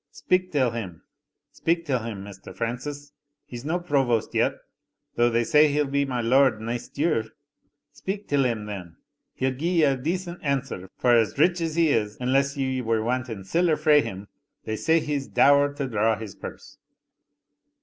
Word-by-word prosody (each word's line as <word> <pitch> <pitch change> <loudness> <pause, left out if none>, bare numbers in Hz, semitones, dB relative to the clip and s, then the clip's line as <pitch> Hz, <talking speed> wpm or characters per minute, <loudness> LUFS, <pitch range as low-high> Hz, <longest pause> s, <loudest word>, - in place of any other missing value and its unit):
"Speak 185 +5 0
till 130 -5 +2
him 100 -8 -6 0.5
speak 170 0 -1
till 135 -5 0
him, 110 -4 -6
Mr. 100 -1 -11
Francis 145 +5 -4 0.3
he's 120 -1 -8
no 165 +5 -1
provost 135 -9 0
yet, - - +2 0.6
though 120 0 +3
they 120 0 +1
say 150 +5 +5
he'll 150 0 +1
be 140 +1 0
my 125 -3 -2
lord 125 0 +3
neist 115 +4 -5
year. 145 -7 +1 0.7
Speak 200 +2 -5
till 145 -1 +2
him, 115 -4 -1
then 90 -5 -7 0.4
he'll 130 0 0
gie 155 +7 -2
ye - - +4
a 140 -2 +4
decent 175 +6 -3
answer 140 - -2
for 120 -1 +4
as 115 +1 +2
rich 175 +4 +3
as 165 -1 -2
he 165 -2 +3
is, 105 -5 0
unless 135 +3 +1
ye 130 -1 -1
were 115 -2 0
wanting 120 -4 -2
siller 165 - +1
frae 150 -1 +5
him 100 -4 -7 0.4
they 110 - -2
say 160 +8 +2
he's 145 -3 -3
dour 145 0 +4
to 140 -1 -4
draw 110 -1 +1
his 110 -3 -8
purse." - - -10
130 Hz, 175 wpm, -25 LUFS, 115-150 Hz, 0.7 s, say